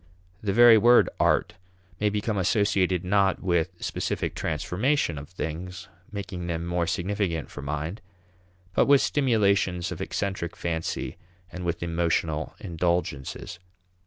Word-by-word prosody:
The 105 - -1
very 115 +1 +8
word 120 +2 +6
art - - +2 0.5
may 105 - +2
become 105 +1 -1
associated 95 -2 +1
not 95 0 +2
with 85 -2 +1
specific - - -2
transformation 90 - 0
of 70 - -10
things, 90 +1 -6 0.2
making 95 -4 -5
them 85 -1 -2
more 85 -1 0
significant 90 -2 -2
for - - -7
mind, 75 +8 -4 0.7
but - - +3
with 140 -1 +6
stimulations 100 -9 +2
of - - -5
eccentric 95 -4 -3
fancy 80 -1 -3 0.3
and 90 - -6
with 85 0 -2
emotional 80 -2 -1
indulgences. 85 -3 -2
90 Hz, 125 wpm, -26 LUFS, 85-100 Hz, 0.7 s, very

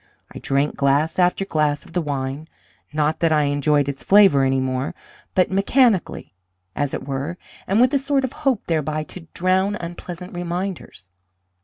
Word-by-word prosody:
I - - -7
drank 140 +2 0
glass 145 +5 +1
after 180 +2 +2
glass 150 -4 0
of - - -16
the 180 - 0
wine 140 0 -4 0.4
not 150 +1 0
that 165 -2 +2
I 150 -1 +3
enjoyed 145 0 +1
its 140 -1 -5
flavour 195 -9 +6
any 135 0 +2
more, 130 +1 -2 0.4
but 185 0 +3
mechanically, 200 - +1 0.4
as 145 -1 -1
it - - -7
were, 140 +5 -3 0.3
and 200 +3 +2
with 250 +2 +4
a 280 - +3
sort 275 0 0
of 260 - -3
hope 260 -6 -1
thereby 155 -1 -1
to 165 +2 -11
drown 190 +3 +1
unpleasant 175 0 -8
reminders. 175 - -5
160 Hz, 165 wpm, -21 LUFS, 145-190 Hz, 0.4 s, flavour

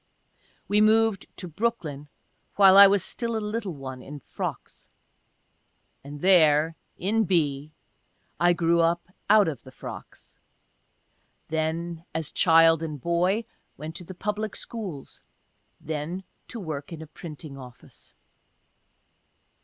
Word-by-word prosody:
We 210 +1 +3
moved 220 -1 +3
to 180 - -6
Brooklyn 160 -6 -3 0.5
while 195 -2 +7
I 200 0 +11
was 195 -1 +2
still 230 +2 -2
a 210 -1 -3
little 205 -7 -3
one 130 -2 -8
in 145 +3 -9
frocks - - -7 0.6
— - - -44
and 145 +1 -9
there 160 -4 +4 0.2
in 215 +4 +1
B. 150 -5 0 0.7
I 175 +1 +4
grew 170 0 +2
up 170 +1 0 0.2
out 210 -2 +6
of 145 -7 -4
the 130 - -14
frocks - - -11 0.5
— - - -44
then, 160 +1 -2
as 160 -2 -2
child 165 -2 +5
and 155 -3 -5
boy, 180 - +1 0.3
went 155 +3 -7
to - - -7
the 185 +2 -10
public 210 +2 -3
schools 190 - -6 0.3
— - - -44
then 160 +5 -3 0.2
to 235 - -7
work 155 -6 -6
in 160 -1 -7
a - - -9
printing 155 -2 -10
office. 125 -3 -14
170 Hz, 135 wpm, -26 LUFS, 150-200 Hz, 0.7 s, I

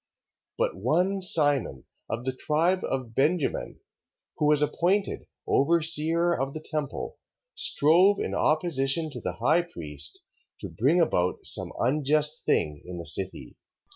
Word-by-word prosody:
But - - -1
one 175 - 0
Simon, 145 - +2 0.3
of 115 +3 -4
the 130 -1 -2
tribe 165 +7 +1
of 130 -4 -4
Benjamin, 150 +5 -1 0.6
who 150 - +1
was 150 0 +3
appointed 185 +6 0 0.2
overseer 165 +2 +3
of 135 -2 -3
the - - -3
temple, 150 -3 -4 0.4
strove 190 - +4
in - - -3
opposition 155 -1 0
to 125 -4 -8
the 90 - -3
high 135 - +2
priest, 75 - -4 0.4
to - - -6
bring 145 +10 +1
about 90 - 0
some - - 0
unjust 150 +4 0
thing 75 -3 0
in 90 -1 -8
the 85 - -7
city. 95 +5 -2
150 Hz, 135 wpm, -26 LUFS, 125-170 Hz, 0.6 s, strove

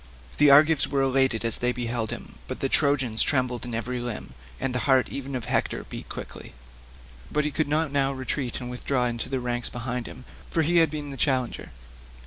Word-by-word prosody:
The 150 -1 +6
Argives 150 +2 +6
were 140 -1 +1
elated 130 -3 +2
as 115 - +3
they 125 0 +1
beheld 120 -2 -3
him, - - -8
but - - -5
the 135 - 0
Trojans 135 -7 +3
trembled 125 -3 +2
in 120 -2 -4
every 125 +2 -3
limb, 120 - -6 0.3
and 135 -1 -1
the 125 - 0
heart 130 -1 +4
even 140 0 -5
of 120 -3 -4
Hector - - 0
beat - - -8
quickly, - - -8 0.8
but 150 0 +1
he 150 - -1
could 155 +2 0
not 155 0 +1
now 140 -1 +2
retreat 130 -1 -3
and 125 -1 -6
withdraw 125 0 -1
into 120 +1 -3
the 135 -1 -1
ranks 120 -1 -2
behind 125 0 -4
him, 125 +1 -11 0.2
for 165 - +1
he 170 +3 +2
had 165 -2 +5
been 145 -1 -5
the 135 - -7
challenger. 130 -4 0
130 Hz, 205 wpm, -26 LUFS, 120-140 Hz, 0.8 s, The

